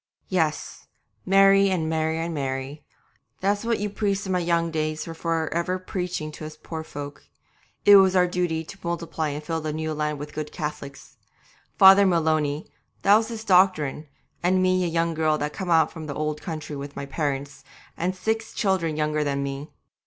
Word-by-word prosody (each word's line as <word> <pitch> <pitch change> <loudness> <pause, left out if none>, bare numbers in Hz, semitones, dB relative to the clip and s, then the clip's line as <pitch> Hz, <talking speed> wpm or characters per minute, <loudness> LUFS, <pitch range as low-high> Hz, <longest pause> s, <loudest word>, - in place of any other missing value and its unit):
'Yes, 160 -5 -1 0.4
marry 195 +1 +6
and 170 -4 0
marry 160 0 0
and 165 +1 -3
marry 135 +1 -4 0.6
that's 205 +2 0
what 230 0 0
you 210 - -1
priests 200 -1 -1
in 190 - -3
my 180 - +2
young 170 -1 0
days 155 -1 -2
were 165 - -6
for 165 -1 -2
ever 170 +2 0
preaching 180 -4 -4
to 155 - -10
us 155 0 -8
poor 160 0 -6
folk. 145 -2 -8 0.6
It 205 0 +10
was 190 -1 +5
our 180 -1 +5
duty 175 -2 -1
to 195 +5 -12
multiply 170 -2 -3
and 145 +1 -5
fill 165 +1 -3
the 155 0 -3
new 155 +1 -3
land 150 0 -2
with 145 +1 -8
good 155 -1 -5
Cath'lics. 150 -3 -7 0.6
Father 195 +1 +8
Maloney, 155 -4 +1 0.4
that 200 - +7
was 220 +1 +2
his 225 -2 -6
doctrine, 180 -7 +3 0.3
and 185 +2 +2
me 185 0 +2
a - - 0
young 165 0 0
girl 155 -1 +1
just 150 0 -3
come 190 -2 -5
out 160 -2 +4
from 160 -2 -8
the 145 - -5
old 150 0 -2
country 155 -3 -6
with 140 0 -7
my 140 - -5
parents, 140 -1 -3 0.3
and 180 +2 -2
six 220 +3 -2
children 180 -6 0
younger 150 0 0
than 140 -1 -1
me. 140 +2 -5
160 Hz, 190 wpm, -25 LUFS, 150-185 Hz, 0.6 s, It